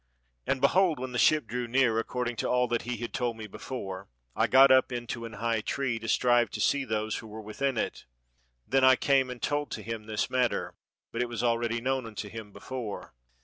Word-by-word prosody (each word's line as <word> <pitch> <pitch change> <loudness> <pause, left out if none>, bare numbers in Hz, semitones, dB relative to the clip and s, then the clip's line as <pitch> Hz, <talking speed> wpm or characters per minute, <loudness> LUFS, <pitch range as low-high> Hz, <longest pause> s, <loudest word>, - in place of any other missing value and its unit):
"And 135 - 0
behold, 170 +3 +4
when 130 0 -5
the 125 - -2
ship 155 -4 +4
drew 120 +2 -3
near, 120 -2 +3
according 120 +1 -2
to - - -1
all 125 0 +2
that 120 - 0
he 120 0 -4
had 120 0 -6
told 120 -2 -1
me 110 - -7
before, 95 -3 -7 0.3
I - - +2
got 135 +1 +7
up 130 0 +5
into 120 -1 -4
an 115 - -8
high 115 0 -1
tree, 125 -1 -2
to 115 - -7
strive 120 0 +3
to - - -4
see 140 -1 +2
those 110 -2 -1
who 110 - -8
were 110 +1 -8
within 130 +5 -2
it. - - -3 0.6
Then 135 0 +2
I 130 0 +8
came 135 0 +2
and 125 -1 -6
told 145 0 -1
to 110 - -5
him 115 0 -5
this 110 -1 -1
matter, 125 -2 0 0.4
but 115 - -2
it 125 - -1
was 120 -1 -3
already 115 -1 +1
known 130 -1 -1
unto 105 -1 -6
him 110 -1 -8
before. 120 -2 -6
120 Hz, 220 wpm, -29 LUFS, 115-130 Hz, 0.6 s, I